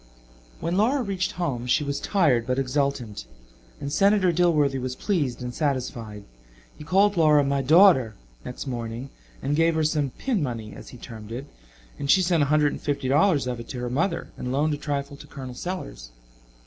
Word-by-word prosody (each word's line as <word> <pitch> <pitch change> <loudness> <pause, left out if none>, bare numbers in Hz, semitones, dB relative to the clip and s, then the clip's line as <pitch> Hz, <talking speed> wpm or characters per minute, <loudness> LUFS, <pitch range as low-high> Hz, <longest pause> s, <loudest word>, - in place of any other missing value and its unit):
When 170 +2 -1
Laura 250 +6 +2
reached 195 -1 -2
home 140 -10 -3
she 125 - +2
was 140 -1 -2
tired 145 - +2
but 130 0 0
exultant, 135 - -1 0.5
and 140 0 -5
Senator 195 0 +4
Dilworthy 155 -6 +2
was 130 0 -4
pleased 140 - -1
and 125 0 -5
satisfied. 120 -7 -3 0.5
He - - -11
called 195 +5 +3
Laura 150 -3 +5
"my 140 0 0
daughter," 140 - +5 0.3
next 125 - -7
morning, 120 0 -5 0.3
and 145 +2 0
gave 165 +1 +3
her 160 - +1
some 150 -2 +1
"pin 230 - -2
money," 115 -6 -4
as - - -11
he 125 - -11
termed 110 -2 -10
it, 125 +4 -5 0.5
and 140 - -4
she 185 +5 +5
sent 175 -3 +2
a 145 - +2
hundred 150 0 +3
and - - -7
fifty 145 -3 -2
dollars 150 0 +3
of 125 -1 -3
it 115 - -9
to 125 - -5
her 120 0 -3
mother 160 +9 -1
and 125 - -4
loaned 150 +3 +1
a - - -2
trifle 140 -1 -4
to 150 - -13
Col. 130 -3 -8
Sellers. 125 - -6
140 Hz, 190 wpm, -25 LUFS, 125-165 Hz, 0.5 s, Laura